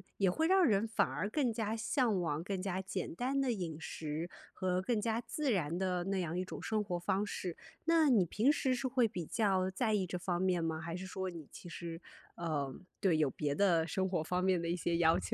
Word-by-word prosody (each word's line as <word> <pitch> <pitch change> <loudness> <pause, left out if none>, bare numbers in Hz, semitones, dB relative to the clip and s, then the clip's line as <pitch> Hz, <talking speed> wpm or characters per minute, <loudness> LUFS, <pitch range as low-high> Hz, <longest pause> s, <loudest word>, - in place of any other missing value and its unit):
也 190 -3 +3
会 320 - +1
让 380 0 +5
人 215 -4 +3
反 220 - +2
而 205 - -3
更 260 -2 +1
加 220 -1 -1
向 220 -3 +1
往 155 -2 -1
更 190 +1 -3
加 190 -1 -2
简 185 -2 -4
单 260 +8 0
的 260 -2 +1
饮 175 -7 -3
食， 160 +3 -4 0.2
和 185 -1 0
更 215 +1 0
加 225 0 0
自 275 +3 -1
然 170 -4 0
的 180 -1 0
那 195 -1 0
样 175 0 -1
一 185 - -1
种 - - -7
生 215 -1 +1
活 180 -4 -2
方 195 +3 0
式。 180 -4 -4 0.3
那 330 -1 +4
你 225 -7 +5
平 215 - +2
时 275 -3 +2
是 255 +1 -1
会 250 -3 +3
比 175 -4 -4
较 190 -1 +1
在 220 +3 0
意 195 -3 +1
这 180 - -3
方 175 0 -1
面 180 -3 +2
吗？ 160 -1 -1
还 170 0 -4
是 185 +1 -5
说 190 0 -3
你 165 -5 -9
其 175 - -10
实， 170 0 -6 0.3
呃 150 -5 -2 0.3
对， 180 -6 +4
有 150 -3 +3
别 145 0 -1
的 170 -1 +3
生 190 +3 0
活 175 -4 0
方 180 +3 0
面 185 -2 +3
的 170 - -2
一 175 - +1
些 170 0 0
要 165 -1 +4
求？ 90 - -4
185 Hz, 255 characters per minute, -34 LUFS, 170-220 Hz, 0.3 s, 让